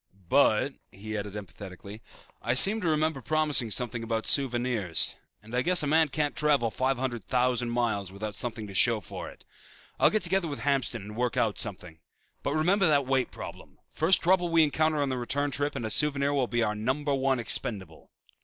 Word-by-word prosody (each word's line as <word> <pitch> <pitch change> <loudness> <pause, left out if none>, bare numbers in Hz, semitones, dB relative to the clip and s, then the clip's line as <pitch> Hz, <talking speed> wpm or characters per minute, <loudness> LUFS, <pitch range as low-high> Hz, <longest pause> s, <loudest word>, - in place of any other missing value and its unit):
"But," - - +3 0.2
he 110 +3 -7
added 105 -1 -5
emphatically, 100 +1 -10 0.4
"I 120 - 0
seem 205 +10 +7
to 175 - -2
remember 155 -2 0
promising 150 -5 0
something 120 +1 -1
about 115 -1 -3
souvenirs 120 - +1 0.3
and 110 +3 -8
I 125 - +2
guess 175 +2 +3
a - - 0
man 160 +2 +3
can't 150 +1 -2
travel 145 -7 +2
five 130 +2 -1
hundred 120 -4 -3
thousand 125 -1 0
miles 110 -5 -1
without 105 +2 -6
something 115 -3 -3
to 100 - -10
show 115 +3 +3
for 95 - -8
it. - - -17 0.5
I'll - - +5
get 215 - -1
together 185 0 +1
with 145 -2 -6
Hamston 135 -6 -1
and 105 +1 -9
work 125 0 -2
out 110 -3 0
something. 90 -6 -3 0.4
But - - -2
remember 180 +5 +2
that 145 -3 +2
weight 130 -1 0
problem. - - -10
First 165 +4 +2
trouble 180 0 +2
we 165 -1 +4
encounter 155 0 +1
on 140 - -2
the 130 -1 -2
return 145 +4 -1
trip 145 +2 -2
and 120 - -4
a 110 - -3
souvenir 140 +2 +1
will 135 -3 0
be 120 0 0
our 105 - 0
number 130 +7 -2
one 135 -1 +1
expendable." 95 -7 -2
125 Hz, 195 wpm, -27 LUFS, 110-150 Hz, 0.5 s, seem